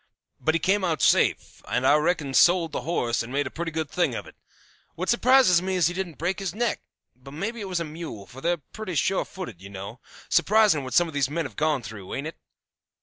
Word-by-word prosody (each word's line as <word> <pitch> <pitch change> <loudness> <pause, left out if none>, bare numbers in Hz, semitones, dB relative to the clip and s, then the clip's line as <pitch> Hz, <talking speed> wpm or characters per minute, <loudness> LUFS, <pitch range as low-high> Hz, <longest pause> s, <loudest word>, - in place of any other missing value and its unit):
But 160 +1 +1
he - - +2
came 195 +4 +1
out 165 -4 0
safe, - - +2
and 125 - 0
I 145 - +6
reckon 150 -2 0
sold 175 +1 +4
the - - -3
horse 120 -8 -1
and 115 - -7
made 140 +1 0
a 130 - -5
pretty 170 0 -4
good 160 -1 -2
thing 175 +4 0
of - - -5
it. - - -14 0.6
What - - -3
surprises 240 -7 +5
me 190 +1 -2
is 175 -3 +3
he - - -5
didn't 180 -3 -4
break 175 +5 -1
his 195 -2 -4
neck; 235 0 -1 0.3
but 135 +3 -13
maybe 220 +8 -4
it 195 - -5
was 180 -2 -1
a 170 - -2
mule, 155 -10 -8
for 125 +6 -12
they're 175 +3 +1
pretty 185 +5 -8
sure 185 +6 +1
footed, 185 - -8
you 95 - -10
know. 100 +4 -8 0.3
Surprising 195 -3 +4
what 130 -2 -5
some 175 - +5
of 160 - -9
these 140 -2 +1
men 165 +2 -2
have 125 -7 -8
gone 150 -2 0
through, 105 -4 -7
ain't 140 - -4
it? 160 - -7
165 Hz, 240 wpm, -25 LUFS, 135-185 Hz, 0.6 s, I